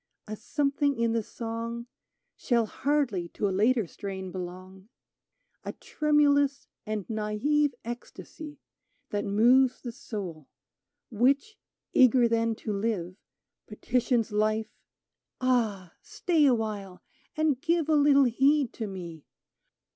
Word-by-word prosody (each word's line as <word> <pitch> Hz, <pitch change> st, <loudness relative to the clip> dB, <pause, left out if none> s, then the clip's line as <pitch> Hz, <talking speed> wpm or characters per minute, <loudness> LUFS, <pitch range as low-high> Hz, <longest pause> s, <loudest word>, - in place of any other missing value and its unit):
A 215 Hz, -, -5 dB
something 280 Hz, +4 st, 0 dB
in 230 Hz, 0 st, +2 dB
the 230 Hz, 0 st, +1 dB
song 230 Hz, +1 st, -5 dB, 0.5 s
Shall 235 Hz, -3 st, +1 dB
hardly 240 Hz, -9 st, -1 dB
to 205 Hz, -, 0 dB
a -, -, -1 dB
later 225 Hz, +3 st, +2 dB
strain 190 Hz, +1 st, -7 dB
belong 185 Hz, +2 st, -8 dB, 0.4 s
— -, -, -50 dB
A -, -, -5 dB
tremulous 285 Hz, -2 st, +1 dB, 0.2 s
and 215 Hz, -3 st, -3 dB
nalVe 235 Hz, +7 st, 0 dB
ecstasy 295 Hz, +5 st, -8 dB, 0.5 s
That 205 Hz, 0 st, -1 dB
moves 245 Hz, +6 st, +4 dB
the 240 Hz, -, -4 dB
soul; 185 Hz, -, -7 dB, 0.6 s
which, 275 Hz, -, +1 dB, 0.4 s
eager 250 Hz, -1 st, +5 dB
then 230 Hz, 0 st, +1 dB
to 215 Hz, -, -1 dB
live, 195 Hz, -4 st, -2 dB, 0.5 s
Petitions 235 Hz, +1 st, 0 dB
Life: 215 Hz, +1 st, 0 dB, 0.4 s
" -, -, -61 dB
Ah, 220 Hz, -9 st, 0 dB
stay 325 Hz, -5 st, +1 dB
awhile, 215 Hz, -6 st, -2 dB, 0.3 s
and 305 Hz, -4 st, +1 dB
give 335 Hz, -2 st, +1 dB
A 315 Hz, -, +2 dB
little 285 Hz, -1 st, +5 dB
heed 270 Hz, +2 st, +2 dB
to 220 Hz, -, -4 dB
me 170 Hz, -5 st, -8 dB
230 Hz, 120 wpm, -28 LUFS, 205-275 Hz, 0.6 s, eager